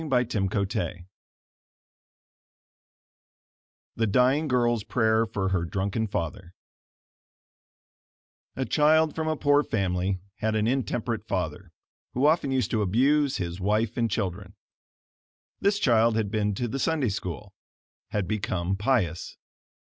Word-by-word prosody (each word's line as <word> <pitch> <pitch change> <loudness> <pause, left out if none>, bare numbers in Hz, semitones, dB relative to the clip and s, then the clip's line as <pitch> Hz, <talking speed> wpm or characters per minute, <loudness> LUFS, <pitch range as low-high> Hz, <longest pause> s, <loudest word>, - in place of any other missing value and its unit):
Essie 125 -7 0
Wilson 95 -3 -2 2.9
THE 115 -1 +1
DYING 130 +8 +3
GIRL'S 120 -4 +1
PRAYER 110 -1 +2
FOR 95 -3 -2
HER 95 -3 0
DRUNKEN 100 +5 -2
FATHER 90 0 -4 2.0
A 130 - -2
child 155 +4 +3
from 160 -1 -3
a 155 -1 0
poor 145 0 +4
family 95 -3 -1 0.2
had 110 0 -1
an 110 0 +1
intemperate 115 -2 -1
father, 90 -1 -3 0.4
who 130 +3 +2
often 155 -2 +3
used 130 -5 0
to 110 - +1
abuse 135 +8 +2
his 90 0 -4
wife 105 +3 +1
and 115 -1 0
children. 100 0 -3 1.0
This 200 +1 +2
child 115 - +3
had 110 -3 -1
been 105 -2 0
to 120 +4 -2
the 135 +4 -4
Sunday 150 -5 +1
School 95 -5 -5 0.6
had 105 -4 -2
become 95 -3 -1
pious. 100 - -1
110 Hz, 120 wpm, -26 LUFS, 95-130 Hz, 2.9 s, poor